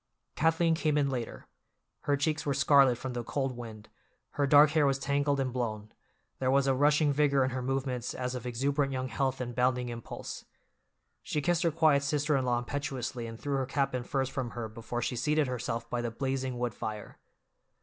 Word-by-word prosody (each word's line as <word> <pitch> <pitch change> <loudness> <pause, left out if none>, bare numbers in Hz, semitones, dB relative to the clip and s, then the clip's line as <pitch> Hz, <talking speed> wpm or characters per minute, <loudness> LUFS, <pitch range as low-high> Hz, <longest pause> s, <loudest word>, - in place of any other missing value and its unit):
Kathleen 165 +1 +3
came 155 -2 +1
in 140 -2 +2
later. 120 -3 -5 0.6
Her 145 -1 +2
cheeks 155 +1 0
were 140 -2 -1
scarlet 140 -2 +5
from 130 +1 -5
the 120 -1 -3
cold 135 +1 -2
wind, 110 -3 -9 0.4
her 140 -1 0
dark 145 +1 +7
hair 155 -2 +3
was 135 -1 +2
tangled 140 +1 0
and 130 -2 -1
blown, 110 -4 -3 0.5
there 130 - +1
was 135 +1 +3
a 135 - +3
rushing 145 +2 +3
vigor 140 -2 +3
in 130 - 0
her 130 0 -3
movements 130 -1 -2
as 125 0 -3
of 125 -1 -5
exuberant 140 +3 0
young 130 -1 -3
health 135 +3 -1
and 120 -1 -4
bounding 125 0 +1
impulse. 115 -1 -7 0.8
She 150 - -2
kissed 175 +4 +1
her 170 - +3
quiet 155 -3 +4
sister 145 +1 +1
in 130 -1 +1
law 120 -1 +2
impetuously 125 -2 -4
and 115 0 -8
threw 140 -1 -1
her 130 -1 -1
cap 135 0 0
and 125 -1 -2
furs 135 +1 -1
from 130 -2 -3
her 115 -2 -3
before 115 +2 -5
she 125 - -2
seated 150 +5 +1
herself 125 -2 -3
by 120 - -2
the 120 - -2
blazing 130 +1 -2
wood 120 -2 -2
fire. 105 -1 -6
135 Hz, 200 wpm, -30 LUFS, 125-145 Hz, 0.8 s, dark